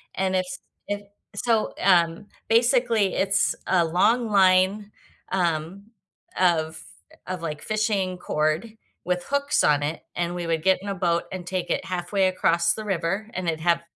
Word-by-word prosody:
and 190 0 0
it's 180 0 -2 0.3
it 205 0 -5 0.2
so, 225 0 0
um, 175 -1 +3 0.2
basically, 235 -3 +3
it's 195 +1 +1
a 180 -2 +3
long 225 +8 +2
line, 195 +1 +3 0.4
um, 180 +3 -2 0.5
of 160 -3 +1 0.4
of, 185 -2 -4
like, 150 -3 -5
fishing 210 -4 -1
cord 155 +7 -1 0.3
with 180 -1 -1
hooks 280 +1 +1
on 145 -1 +3
it 155 +3 -3
and 175 0 -2
we 175 -1 -4
would 160 -1 -1
get 190 +1 +4
in 200 - -8
a 200 - -2
boat 170 -2 +1
and 185 -2 -6
take 185 -1 -3
it - - -1
halfway 185 +2 0
across 170 -2 +2
the 215 - -6
river 195 +3 -2
and 180 -1 -4
it'd 160 -1 -1
have, 170 0 +2
185 Hz, 160 wpm, -24 LUFS, 170-205 Hz, 0.5 s, get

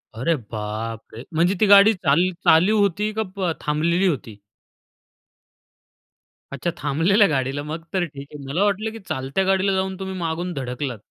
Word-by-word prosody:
अरे 155 +9 +1
बापरे! 110 0 -6
म्हणजे 175 +4 +2
ती - - +4
गाडी 200 +2 +8
चाल 165 -6 +1 0.3
चालू 185 +7 +5
होती 205 +2 +1
का 190 -4 -2
थांबलेली 170 +5 +1
होती? 135 - -3 2.2
अच्छा 140 +5 -3
थांबलेल्या 195 +9 +3
गाडीला. 140 -2 -1
मग 155 +2 -6
तर 185 -2 +1
ठीक 140 -3 -10
आहे. 145 -1 -9
मला 165 +9 0
वाटलं 205 +2 0
की 225 - -9
चालत्या 135 +8 -1
गाडीला 195 +1 +2
जाऊन 190 0 -1
तुम्ही 190 0 -5
मागून 175 +1 -3
धडकलात. 125 -2 -4
165 Hz, 145 wpm, -22 LUFS, 140-190 Hz, 2.2 s, गाडी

